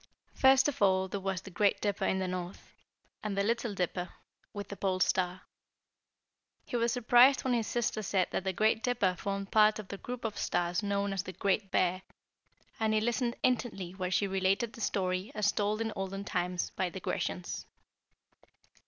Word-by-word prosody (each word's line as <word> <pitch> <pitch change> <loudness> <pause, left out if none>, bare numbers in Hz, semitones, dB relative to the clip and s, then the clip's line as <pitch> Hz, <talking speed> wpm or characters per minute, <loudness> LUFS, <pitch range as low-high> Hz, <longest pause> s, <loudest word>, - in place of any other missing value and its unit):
First 265 +1 +5
of 290 - -3
all, 190 -1 +4
there 200 +2 -4
was 190 -1 -2
the 195 - -11
Great 200 +3 +2
Dipper 205 -1 -1
in 190 - +1
the 190 0 -1
North, 180 0 -6 0.5
and 210 -2 -3
the 200 - +2
Little 230 0 -1
Dipper 180 0 -2 0.4
with 205 -1 -7
the 200 - -5
Pole 190 -1 -1
Star. 185 0 +1 1.2
He - - -5
was 235 0 +2
surprised 245 +3 +5
when 260 - +1
his 230 -3 0
sister 230 -2 -1
said 190 -2 0
that - - -1
the 190 - 0
Great 215 +4 +2
Dipper 225 -7 +1
formed 195 +1 -4
part 215 0 +5
of 215 -3 -8
the 200 - -6
group 245 -1 -6
of 215 - -3
stars 175 0 0
known 200 -1 -1
as 195 - -1
the 185 - -8
Great 195 +1 0
Bear, 185 0 +1 0.8
and 220 -1 +2
he - - +4
listened 240 +2 0
intently 230 -8 0
while 185 -1 -3
she 190 +2 +2
related 195 +4 0
the 230 - -10
story 185 -1 -1
as 210 -1 +2
told 210 +1 0
in 225 -1 -2
olden 195 +1 -4
times 180 -2 -2
by 185 - -1
the 190 - -7
Grecians. 180 0 -3
200 Hz, 190 wpm, -31 LUFS, 185-220 Hz, 1.2 s, First